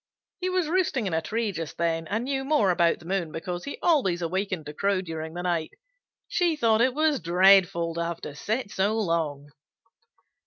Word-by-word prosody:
He 370 0 -1
was 365 -3 0
roosting 315 - 0
in 185 - -2
a 160 - +1
tree 220 +5 -2
just 165 -4 -6
then, 165 -1 -1
and 220 +6 -1
knew 270 +1 -2
more 270 -9 +3
about 170 -1 +2
the 170 - -16
moon 175 -3 -2
because 175 +2 -5
he 285 - -5
always 195 - +2
awakened 185 -1 -2
to 150 - -7
crow 195 +4 +1
during 160 -1 -6
the 175 - -4
night. 170 -3 -1 0.5
She 345 -3 +1
thought 230 -6 +3
it 255 +1 +2
was 310 -1 +2
dreadful 180 -1 +4
to 170 +1 -2
have 170 0 -4
to 145 - -7
sit 215 - -3
so 205 +3 0
long." 160 -8 -1
185 Hz, 195 wpm, -26 LUFS, 165-235 Hz, 0.5 s, dreadful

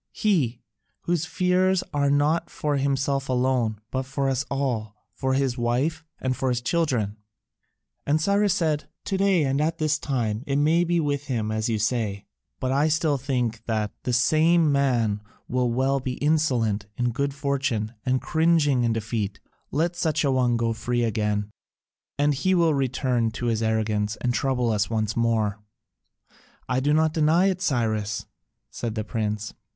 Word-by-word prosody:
He, 140 - 0 0.4
whose 175 -3 -1
fears 185 0 +2
are 140 -1 +2
not 145 +4 +2
for 145 -1 -1
himself 135 0 0
alone, 125 -4 +1
but 130 - 0
for 135 +1 -2
us 135 0 0
all, 120 -7 -2 0.2
for 130 +3 -1
his 135 -2 0
wife, 135 +7 0 0.2
and 130 -1 -1
for 130 - -1
his 125 -1 0
children." 120 -7 0 0.9
And 150 +2 +3
Cyrus 200 +3 +2
said, 155 -5 0 0.2
"To 195 - -1
day 195 -4 +3
and 135 +1 +1
at 160 +2 0
this 155 -1 +1
time, 120 -6 -2
it 140 - 0
may 155 +4 +3
be 170 0 +1
with 145 -2 -1
him 115 -6 -2
as 110 +1 -1
you 110 - +1
say: 105 -3 -1 0.3
but 130 - -1
I 140 +3 +3
still 155 -2 +1
think 125 -4 -2
that 110 -2 -1
the 125 - -2
same 155 +6 +4
man 120 -7 +1 0.3
may - - -9
well 130 +3 +1
be 130 -1 -3
insolent 125 -9 +1
in 120 -1 +1
good 140 +3 -2
fortune 135 -6 -1
and 130 0 +1
cringing 160 -6 +2
in 115 -1 +2
defeat: 110 -2 -3 0.3
let 170 +4 0
such 160 -3 0
an 135 - +2
one 125 -2 +2
go 115 0 0
free 120 +1 -1
again, 105 -2 -1 0.7
and 145 +1 +3
he 185 +7 +1
will 165 -3 +3
return 130 -3 0
to 120 - -4
his 115 -2 0
arrogance 110 -1 0
and 120 +3 -1
trouble 125 -2 +1
us 105 -1 0
once 110 -2 -1
more." 110 -3 +1 1.1
"I 130 0 +1
do 145 +3 +1
not 155 +1 +3
deny 165 +5 +3
it, 185 0 -5
Cyrus," 110 - -1 0.5
said 115 -2 -4
the 110 - -2
prince. 105 -1 -3
130 Hz, 165 wpm, -25 LUFS, 115-150 Hz, 1.1 s, same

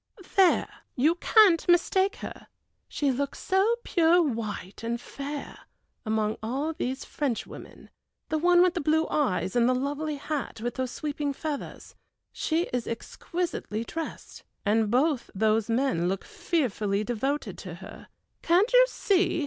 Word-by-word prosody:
"There; 380 -3 +5 0.3
you 295 +6 +3
can't 370 -1 +4
mistake 380 +3 +3
her, - - -9 0.4
she 285 -2 0
looks 280 +2 -2
so 390 +5 +2
pure 340 0 +4
white, 225 - -3
and 235 +1 -2
fair, 280 +3 -7 0.5
among 215 0 0
all 270 +8 -2
these 265 -2 -3
Frenchwomen 270 -7 -5 0.4
The 315 - 0
one 350 +2 +5
with 365 -1 +3
the 345 - -2
blue 315 +2 +2
eyes 250 -9 0
and 240 0 +4
the 255 - +3
lovely 290 +3 -2
hat 290 -4 -4
with 240 +2 -3
those 260 -1 -2
sweeping 290 +1 -3
feathers. 295 0 -6 0.4
She 325 +2 0
is 245 -2 -1
exquisitely 230 - -4
dressed, 325 +7 -7 0.2
and 215 +1 +2
both 265 +3 +1
those 220 +2 +2
men 230 -8 +1
look 195 0 -2
fearfully 215 - -1
devoted 265 +6 -2
to - - -7
her. - - -11 0.3
Can't 375 +8 +3
you - - +8
see? 385 -7 +1
280 Hz, 140 wpm, -27 LUFS, 235-335 Hz, 0.5 s, you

